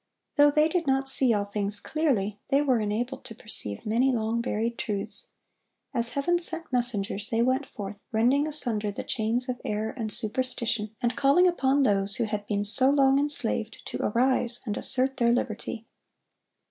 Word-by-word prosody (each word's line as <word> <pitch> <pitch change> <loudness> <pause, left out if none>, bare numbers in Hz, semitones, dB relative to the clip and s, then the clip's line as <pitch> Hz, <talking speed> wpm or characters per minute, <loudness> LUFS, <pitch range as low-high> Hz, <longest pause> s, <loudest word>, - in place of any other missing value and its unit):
Though 290 0 +5
they 305 +1 +2
did 330 -1 -2
not 270 0 0
see 265 -2 +6
all 205 -2 0
things 205 0 -4
clearly, 215 -11 -2
they 275 - +1
were 260 -5 +1
enabled 235 +5 -4
to 225 - -9
perceive 105 - -3
many 240 +5 +1
long 230 -1 -2
buried 230 0 -3
truths. 210 - -5 0.7
As 235 -2 -1
Heaven 345 +5 0
sent 330 -4 -4
messengers 215 -3 +5
they 230 -2 0
went 260 +3 -1
forth, 200 -1 -9
rending 250 +7 +1
asunder 230 -9 +2
the 200 - -7
chains 235 +2 -2
of 250 -1 -5
error 215 +1 -3
and 225 -4 -5
superstition, 225 -1 -1
and 240 0 -1
calling 285 +7 +3
upon 280 -5 +1
those 200 -4 +1
who - - -1
had 210 -2 -5
been 205 -1 -2
so 240 +6 +8
long 275 -1 +3
enslaved, 250 -6 -2
to - - -6
arise 240 +1 0
and 210 -3 -4
assert 265 0 +1
their 235 -1 +2
liberty. 230 -1 -4
235 Hz, 170 wpm, -25 LUFS, 215-270 Hz, 0.7 s, so